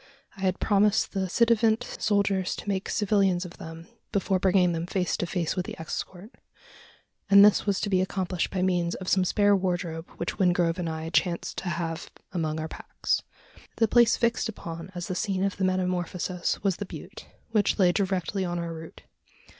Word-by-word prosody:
I 195 Hz, -, -12 dB
had 185 Hz, -1 st, 0 dB
promised 210 Hz, 0 st, +3 dB
the 190 Hz, -2 st, -2 dB
ci 235 Hz, +6 st, +4 dB
devant 230 Hz, 0 st, +3 dB
soldiers 200 Hz, -5 st, 0 dB
to -, -, -9 dB
make 195 Hz, -1 st, -1 dB
civilians 195 Hz, -3 st, +2 dB
of 180 Hz, -, -10 dB
them 165 Hz, +1 st, -9 dB, 0.3 s
before 195 Hz, -2 st, +1 dB
bringing 185 Hz, -1 st, +3 dB
them 165 Hz, 0 st, -3 dB
face 180 Hz, -1 st, 0 dB
to 175 Hz, -, -2 dB
face 170 Hz, -2 st, -1 dB
with 180 Hz, -2 st, -2 dB
the -, -, -7 dB
escort; 180 Hz, +5 st, -6 dB, 1.0 s
and 200 Hz, 0 st, +9 dB
this 210 Hz, 0 st, +4 dB
was 200 Hz, -1 st, +2 dB
to 205 Hz, -, -1 dB
be 185 Hz, -1 st, +3 dB
accomplished 185 Hz, -2 st, -1 dB
by 185 Hz, -1 st, -1 dB
means 175 Hz, -2 st, +1 dB
of 185 Hz, -, -8 dB
some 190 Hz, 0 st, +3 dB
spare 205 Hz, +2 st, +3 dB
wardrobe 175 Hz, -3 st, -2 dB
which 170 Hz, -, -4 dB
Wingrove 175 Hz, -2 st, +2 dB
and 170 Hz, -2 st, -2 dB
I 160 Hz, 0 st, -4 dB
chanced 170 Hz, +1 st, 0 dB
to 185 Hz, -, -4 dB
have 165 Hz, -1 st, -3 dB, 0.2 s
among 160 Hz, -4 st, -2 dB
our 160 Hz, -, -3 dB
packs. -, -, -2 dB, 0.5 s
The 225 Hz, -, +3 dB
place 235 Hz, +1 st, +5 dB
fixed 235 Hz, -1 st, +1 dB
upon 170 Hz, -4 st, -7 dB
as 175 Hz, -1 st, -4 dB
the -, -, -2 dB
scene 190 Hz, +1 st, -1 dB
of 195 Hz, -1 st, -1 dB
the 190 Hz, -, +1 dB
metamorphosis 180 Hz, -1 st, -1 dB
was 195 Hz, -4 st, +1 dB
the 205 Hz, -, -5 dB
butte -, -, -10 dB, 0.2 s
which 210 Hz, -3 st, +2 dB
lay 185 Hz, -4 st, +5 dB
directly 190 Hz, +1 st, -1 dB
on 175 Hz, -1 st, -2 dB
our 170 Hz, -1 st, -3 dB
route. 160 Hz, 0 st, -10 dB
185 Hz, 190 wpm, -27 LUFS, 175-200 Hz, 1.0 s, and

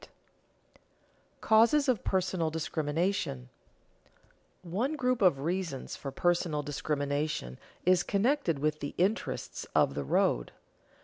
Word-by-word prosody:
[Sidenote: -, -, -27 dB
Causes 235 Hz, +7 st, +4 dB
of 250 Hz, -6 st, +1 dB
personal 185 Hz, -3 st, 0 dB
discrimination] 155 Hz, -, -2 dB, 1.1 s
One 220 Hz, -, -1 dB
group 250 Hz, -4 st, 0 dB
of 175 Hz, -8 st, +4 dB
reasons 170 Hz, -3 st, -3 dB
for 140 Hz, -, -6 dB
personal 170 Hz, -1 st, 0 dB
discrimination 145 Hz, -, -2 dB, 0.3 s
is 180 Hz, -1 st, +5 dB
connected 210 Hz, -, +1 dB
with 150 Hz, +2 st, -1 dB
the 145 Hz, -, -5 dB
interests 195 Hz, +6 st, -1 dB
of -, -, +4 dB
the 70 Hz, -, -3 dB
road. -, -, +1 dB
170 Hz, 110 wpm, -30 LUFS, 145-200 Hz, 1.1 s, is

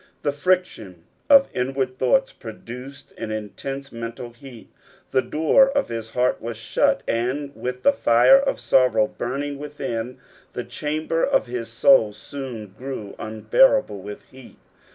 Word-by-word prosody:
The 145 Hz, -, +1 dB
friction 145 Hz, -, -1 dB, 0.3 s
of 275 Hz, -1 st, +7 dB
inward 130 Hz, 0 st, -2 dB
thoughts -, -, +2 dB
produced 125 Hz, +4 st, -10 dB
an 115 Hz, -, -4 dB
intense 135 Hz, +6 st, -6 dB
mental 115 Hz, +1 st, -7 dB
heat. 120 Hz, -1 st, -14 dB, 0.4 s
The 130 Hz, -, +3 dB
door 160 Hz, -, +3 dB
of 275 Hz, -, -1 dB
his 115 Hz, -1 st, -5 dB
heart 125 Hz, 0 st, +1 dB
was 115 Hz, -1 st, -5 dB
shut, 115 Hz, -, +1 dB
and 130 Hz, +5 st, -2 dB
with 125 Hz, 0 st, -5 dB
the 280 Hz, -, +5 dB
fire 120 Hz, -, +5 dB
of 275 Hz, 0 st, -1 dB
sorrow 130 Hz, +1 st, +3 dB
burning 140 Hz, +2 st, -4 dB
within, 125 Hz, -5 st, -5 dB, 0.4 s
the -, -, -4 dB
chamber 155 Hz, +2 st, -2 dB
of -, -, +2 dB
his 120 Hz, -2 st, -5 dB
soul 115 Hz, -, +4 dB
soon 120 Hz, -7 st, -8 dB
grew 125 Hz, -6 st, -7 dB
unbearable 110 Hz, -, +2 dB
with 105 Hz, +2 st, -9 dB
heat. 130 Hz, -1 st, -15 dB
125 Hz, 140 wpm, -23 LUFS, 115-145 Hz, 0.4 s, of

